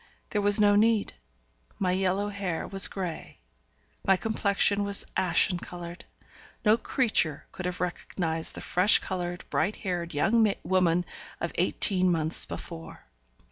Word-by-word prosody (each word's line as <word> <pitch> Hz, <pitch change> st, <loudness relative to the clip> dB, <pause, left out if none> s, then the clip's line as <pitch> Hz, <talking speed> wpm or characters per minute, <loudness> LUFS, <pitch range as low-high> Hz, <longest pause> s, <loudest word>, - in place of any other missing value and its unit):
There 210 Hz, -, 0 dB
was 205 Hz, +1 st, +5 dB
no 205 Hz, -1 st, +4 dB
need; 220 Hz, 0 st, +2 dB, 0.6 s
my 185 Hz, -2 st, 0 dB
yellow 190 Hz, +2 st, 0 dB
hair 195 Hz, -5 st, -4 dB
was 195 Hz, 0 st, +5 dB
grey, 180 Hz, -4 st, -7 dB, 0.6 s
my 195 Hz, -1 st, +3 dB
complexion 200 Hz, -1 st, +1 dB
was 200 Hz, 0 st, +1 dB
ashen 180 Hz, 0 st, +2 dB
coloured, 175 Hz, 0 st, -9 dB, 0.6 s
no 215 Hz, +1 st, +6 dB
creature 220 Hz, -, 0 dB
could 185 Hz, -, -5 dB
have 180 Hz, -, -5 dB
recognized 175 Hz, -2 st, -2 dB
the -, -, -6 dB
fresh 185 Hz, +4 st, +4 dB
coloured, 175 Hz, -2 st, -5 dB
bright 190 Hz, +7 st, 0 dB
haired 175 Hz, -5 st, -4 dB
young 215 Hz, +6 st, +2 dB
woman 180 Hz, -1 st, +1 dB, 0.3 s
of -, -, -3 dB
eighteen 185 Hz, -3 st, +2 dB
months 160 Hz, -1 st, +1 dB
before. 165 Hz, -1 st, -9 dB
185 Hz, 135 wpm, -27 LUFS, 175-205 Hz, 0.6 s, no